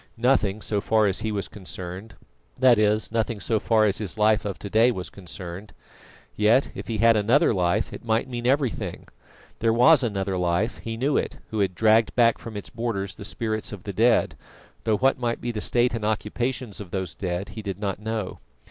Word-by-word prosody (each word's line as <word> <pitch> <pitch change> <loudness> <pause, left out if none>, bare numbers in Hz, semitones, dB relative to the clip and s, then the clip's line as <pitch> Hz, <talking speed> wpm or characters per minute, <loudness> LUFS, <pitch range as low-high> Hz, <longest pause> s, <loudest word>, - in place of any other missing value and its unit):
Nothing 110 -4 +1
so 105 -2 -1
far 110 +1 +2
as 95 -2 +1
he 110 - -2
was 100 -2 -2
concerned; 95 +1 -8 0.4
that 125 -3 +5
is, 105 +1 +2
nothing 115 -1 -1
so 110 +1 0
far 110 -1 +3
as 100 -2 +1
his 105 -3 -4
life 105 +1 +3
of 100 -3 -3
to - - -7
day 110 +4 +4
was 95 -7 -4
concerned. 90 +1 -9 0.6
Yet, 110 +6 +3
if - - -8
he 115 - -2
had 115 +1 +5
another 115 +6 +3
life, 95 +3 0
it - - -8
might 115 +2 0
mean 120 -1 -3
everything. 135 -3 -1 0.5
There 115 0 +2
was 125 +7 +6
another 95 -4 -1
life; 90 +6 0
he 115 0 -5
knew 135 +4 +1
it, - - -2
who 110 - -2
had 95 -3 0
dragged 110 +2 +3
back 115 -2 +4
from 110 -2 -8
its 100 - -7
borders 110 -5 -3
the - - -10
spirits 110 0 -2
of 100 -4 -8
the 100 - -5
dead, 115 +5 +3 0.5
though 110 -2 +2
what 135 +2 +2
might 120 -1 -1
be 120 - -3
the 110 -2 -4
state 120 +2 +2
and 115 -2 -3
occupations 110 +1 -2
of 95 - -9
those 95 -2 -3
dead 90 +1 -4
he 105 +2 -7
did 100 -3 -5
not 100 -2 -3
know. 110 -2 -4
110 Hz, 205 wpm, -25 LUFS, 100-115 Hz, 0.6 s, was